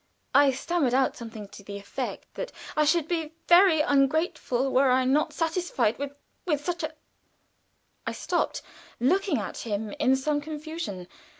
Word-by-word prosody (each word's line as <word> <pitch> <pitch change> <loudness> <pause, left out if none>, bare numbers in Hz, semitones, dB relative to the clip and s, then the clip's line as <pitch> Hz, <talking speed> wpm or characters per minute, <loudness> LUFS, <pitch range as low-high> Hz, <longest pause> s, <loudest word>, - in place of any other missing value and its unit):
I 285 0 +6
stammered 270 -1 0
out 265 -1 +2
something 225 -3 -8
to 200 - -12
the 200 0 -7
effect 220 +6 -5
that - - -5 0.2
"I 305 - +3
should 310 +1 +2
be 325 -2 -2
very 350 -3 +7
ungrateful 280 -2 +1
were 265 +1 +5
I 255 0 +3
not 290 +4 +2
satisfied 325 - 0
with 285 0 -3 0.4
with 295 -3 0
such 350 -1 -2
a 315 0 -4 0.6
" - - -25
I - - 0
stopped, - - -1 0.4
looking 350 - +2
at - - -4
him 210 -1 -3
in 260 +1 +4
some 290 +2 0
confusion. 305 - -6
285 Hz, 160 wpm, -27 LUFS, 255-320 Hz, 0.6 s, very